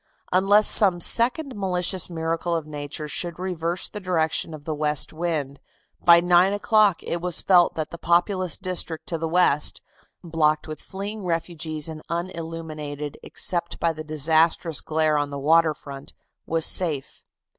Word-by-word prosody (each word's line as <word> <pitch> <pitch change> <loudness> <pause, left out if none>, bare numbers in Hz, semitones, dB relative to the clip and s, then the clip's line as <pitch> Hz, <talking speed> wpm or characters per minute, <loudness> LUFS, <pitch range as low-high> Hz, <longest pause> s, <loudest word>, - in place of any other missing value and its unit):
Unless 200 +3 +4
some 190 -5 +4
second 250 - +2
malicious 185 -2 -1
miracle 165 +1 -2
of 165 -2 -3
nature 150 0 -6
should 170 +3 -4
reverse 175 -1 -3
the 210 - -8
direction 165 -4 -1
of 155 -2 -9
the 155 - -3
west 150 0 0
wind, 155 -4 -3 0.4
by 170 -1 +8
nine 175 +2 +4
o'clock 205 -2 +2
it 170 - -3
was 180 -1 -1
felt 180 -2 +4
that 155 -1 -4
the 170 - -8
populous 175 +1 +1
district 180 -4 -2
to 165 - -3
the 165 - -2
west, 160 -3 +3 0.4
blocked 155 -2 +1
with 155 0 -7
fleeing 200 +2 -6
refugees 165 -3 -3
and 155 -1 -7
unilluminated 160 -4 -5
except 170 -2 -2
by 170 -1 +1
the 155 0 -7
disastrous 160 +2 +1
glare 155 -1 +1
on 145 0 -2
the 140 - -6
water 155 +2 +3
front, 140 -1 -10 0.3
was 165 -1 +1
safe. 155 -7 0
165 Hz, 155 wpm, -24 LUFS, 155-180 Hz, 0.4 s, by